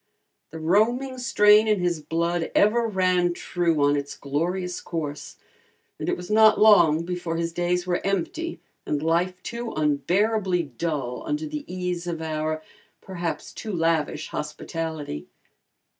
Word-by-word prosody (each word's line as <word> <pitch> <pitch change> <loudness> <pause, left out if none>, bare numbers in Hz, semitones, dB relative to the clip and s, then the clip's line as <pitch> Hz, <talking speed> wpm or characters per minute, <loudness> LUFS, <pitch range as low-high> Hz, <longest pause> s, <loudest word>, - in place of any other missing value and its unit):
The 160 - -8
roaming 235 +10 +1
strain 210 -2 +5
in 210 -2 +2
his 175 -3 0
blood 165 +2 -1
ever 230 +3 +4
ran 185 -3 +2
true 170 -5 0
on 145 0 +4
its 140 0 -4
glorious 175 +6 -2
course, 150 -4 -5 0.6
and - - -2
it - - 0
was 180 +3 -8
not 215 0 +6
long 170 -7 +6
before 175 -2 -3
his 165 0 -2
days 175 +1 0
were 175 -1 0
empty 200 - -2 0.2
and 150 0 -2
life 175 +3 0
too 235 0 -5
unbearably 180 +6 +1
dull 140 -3 -3
under 300 +1 -1
the 300 -5 -6
ease 180 -1 -3
of 170 -2 -3
our, 155 0 -2 0.4
perhaps 175 -3 -4
too 220 - -6
lavish, 165 -2 0
hospitality. 150 - -5
175 Hz, 140 wpm, -25 LUFS, 160-205 Hz, 0.6 s, not